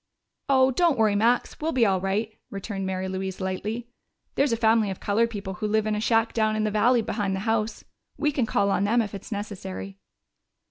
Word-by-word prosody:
"Oh, 260 -1 +5
don't 335 0 +2
worry, 220 -2 +3
Max, 235 +4 +1
we'll 320 +1 -1
be 245 -3 +4
all 190 -3 +2
right," 210 +3 -1
returned 195 -1 -4
Mary 190 0 -2
Louise 190 0 -4
lightly. 210 +5 -3 0.5
"There's 280 -2 +2
a 230 - +1
family 220 -2 +3
of 190 - -5
colored 225 +3 +1
people 200 -3 -5
who 210 +4 -3
live 215 0 +1
in 215 - 0
a 210 - -1
shack 225 0 +2
down 215 -1 +1
in 215 - 0
the 215 - 0
valley 230 +3 +3
behind 200 -3 -1
the 190 - -3
house. 225 0 -1 0.3
We 300 -1 +1
can 265 -5 0
call 200 -1 +1
on 195 - +1
them 230 +3 +3
if 210 - -7
it 195 - -6
is - - -13
necessary." 195 -2 -6
215 Hz, 220 wpm, -25 LUFS, 195-230 Hz, 0.5 s, Oh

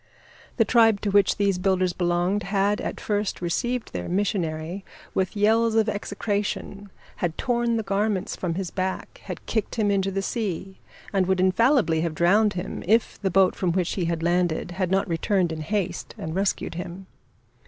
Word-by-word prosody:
The 225 - +4
tribe 225 -2 +4
to 205 - -1
which 200 -1 +4
these 200 -3 +1
builders 185 -1 +1
belonged 175 +3 +1
had 200 +1 +1
at - - -4
first 205 -1 -1
received 240 +8 -2
their 90 -1 -4
missionary 180 -2 -1 0.3
with 190 +2 -1
yells 225 +2 +3
of 220 -1 +3
execration, 205 -1 -3 0.3
had 170 -2 -2
torn 235 -2 +1
the 225 - -1
garments 200 -1 -1
from 170 -3 -3
his 185 -1 -3
back, 190 0 -4
had - - -7
kicked 220 -3 -2
him 210 -3 +2
into 195 -1 +1
the 195 0 -2
sea 195 -4 -3 0.3
and 190 -2 +2
would 190 -1 +2
infallibly 190 - +3
have 165 -2 -2
drowned 205 +6 +4
him 180 +1 -5
if 225 +3 +2
the 195 - +1
boat 190 0 +4
from 180 -3 0
which 180 -1 0
he 180 -4 -1
landed 175 +1 0
had 185 0 -1
not 195 +1 +1
returned 175 +1 +1
in 160 -1 -4
haste 185 +1 -3
and 160 - -5
rescued 195 +2 -1
him. 175 +2 -7
195 Hz, 175 wpm, -25 LUFS, 175-205 Hz, 0.3 s, The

